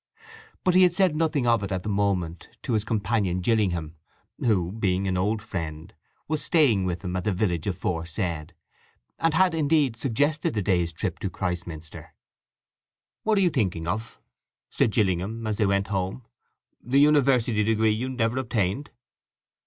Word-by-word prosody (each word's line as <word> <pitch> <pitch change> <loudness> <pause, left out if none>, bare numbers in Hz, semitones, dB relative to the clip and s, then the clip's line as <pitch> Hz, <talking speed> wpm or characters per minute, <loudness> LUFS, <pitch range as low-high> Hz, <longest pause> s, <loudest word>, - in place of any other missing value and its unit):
But 185 - +3
he 185 - +6
had 180 -2 +5
said 185 -5 +3
nothing 155 -4 +1
of 115 -2 +3
it 100 0 -4
at 95 -1 -2
the - - -6
moment 95 -5 -1
to - - -2
his 110 -2 +1
companion 105 -4 0
Gillingham, 90 -6 0 0.4
who, 95 -7 +1
being 95 -2 0
an 95 - 0
old 105 +4 0
friend, 80 -1 -6 0.3
was 155 0 -1
staying 130 - +3
with 90 0 -3
him 90 -1 -3
at 90 - -2
the 105 - 0
village 90 -4 -1
aforesaid, 85 -2 -3 0.6
and 165 -1 +1
had, 185 0 +4
indeed, 150 -5 +2
suggested 140 +4 0
the 105 - 0
day's 90 -3 +1
trip 80 - -4
to - - -2
Christminster. 85 -3 -6 1.1
"What 215 -1 +1
are - - +4
you 180 -3 +3
thinking 95 - -1
of?" 110 +6 -4 0.5
said - - +2
Gillingham, 105 +2 0
as 105 -1 -1
they 105 - +2
went 100 0 0
home. 95 +4 -3 0.6
"The 130 +4 +2
university 135 -7 +4
degree 110 0 +2
you 120 +5 -2
never 125 -1 0
obtained?" 110 +1 -1
105 Hz, 160 wpm, -25 LUFS, 90-130 Hz, 1.1 s, he